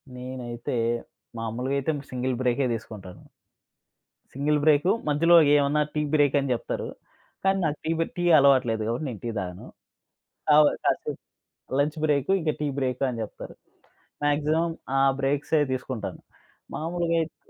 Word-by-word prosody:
నేనైతే, 125 0 -5 0.6
మామూలుగైతే 130 +6 -1 0.2
single 130 0 -1
బ్రేకే 130 +1 +1
దీసుకుంటాను. 105 -5 -8 1.1
Single 145 +2 +1
break, 155 +4 +4 0.2
మధ్యలో 165 +4 +4 0.2
ఏమన్నా 145 +1 +3
టీ 150 - 0
బ్రేక్ 145 -2 +3
అని 140 -1 -2
జెప్తారు. 115 - -4 0.6
కానీ 195 0 +3
నాకు 150 -1 -1
టీ 160 - 0
బె 165 - +1
టీ 175 - -1
అలవాటు 135 -2 +5
లేదు 110 -1 -2
గాబట్టి, 120 +7 -2
నేను 110 - -7
టీ 120 - -1
తాగను. 90 -1 -6 0.8
కౌ 150 - +7 0.3
కాసేపు - - 0 0.6
లంచ్ 150 +3 0
బ్రేక్ 145 0 +1
ఇంక 155 -3 0
టీ 150 - 0
బ్రేక్ 130 0 -2
అని 120 - -5
జెప్తరు. 105 - -9 0.7
మాక్సిమం 155 +3 +1 0.3
ఆ - - +4 0.2
బ్రేక్ససవి 145 +2 +1
తీసుకుంటాను. 125 -2 -5 0.6
మామూలుగైతే 165 0 -1
140 Hz, 130 wpm, -26 LUFS, 125-150 Hz, 1.1 s, కౌ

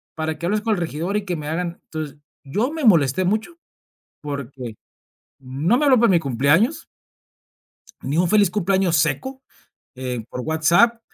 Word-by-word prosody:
para 160 0 -3
que 170 - -5
hables 210 +4 0
con 220 0 +1
el - - -4
regidor 170 +4 -2
y 210 - -4
que 180 -2 -2
me 150 -2 -5
hagan", 170 +1 -3
entonces, 155 -2 -5 0.3
yo 210 - -1
me 315 -3 -3
molesté 170 - +4
mucho 220 - -1 0.6
porque 140 -4 -6 0.7
no 140 - +1
me 300 - +2
habló 260 -4 +5
para 235 -3 +4
mi 175 - +4
cumpleaños. 145 - +1 1.2
Ni 140 +3 -2
un 175 +1 +2
feliz 205 -2 +4
cumpleaños 190 -2 +1
seco, 265 - -1 0.5
eh, 125 -2 -4
por 125 - -5
WhatsApp 170 - +3
170 Hz, 160 wpm, -21 LUFS, 145-210 Hz, 1.2 s, habló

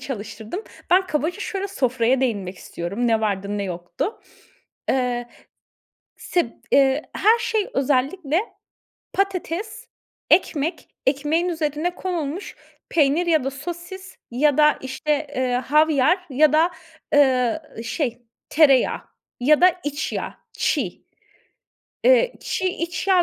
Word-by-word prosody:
çalıştırdım. 225 - -6 0.3
Ben 370 +1 +5
kabaca 320 +5 -2
şöyle 395 0 -3
sofraya 255 -5 +1
değinmek 200 -7 -1
istiyorum. 200 +8 -3
Ne 225 -1 +2
vardı 205 -1 -1
ne - - -1
yoktu. 175 - -4 0.7
Eee, 245 -2 0 0.9
sib 350 -7 0 0.2
eee, 275 +2 +4
her 445 +4 +4
şey 445 -3 0
özellikle 280 +4 +1 0.7
patates, 395 +4 -2 0.4
ekmek, 320 -2 +1 0.2
ekmeğin 300 +6 +1
üzerine 320 +1 -2
konulmuş 350 -1 -4 0.3
peynir 305 +2 +3
ya 315 -5 +3
da 270 - -1
sosis 350 +6 -8
ya 285 +3 +2
da 300 0 +5
işte, 290 +3 -2
eee, 255 -1 0
havyar 300 +5 +3
ya 295 +3 +4
da, 325 +3 +4 0.4
ııı, 260 0 +3 0.2
şey 240 -1 -3 0.3
tereyağı 280 -5 +4 0.4
ya 295 +6 +4
da 365 - +8
iç 290 +1 -3
yağ - - -4 0.2
çiğ, - - -1 1.0
eee, - - +5
çiğ 375 - -2
iç 345 +1 -4
yağ 370 -2 +5
295 Hz, 115 wpm, -22 LUFS, 255-355 Hz, 1.0 s, da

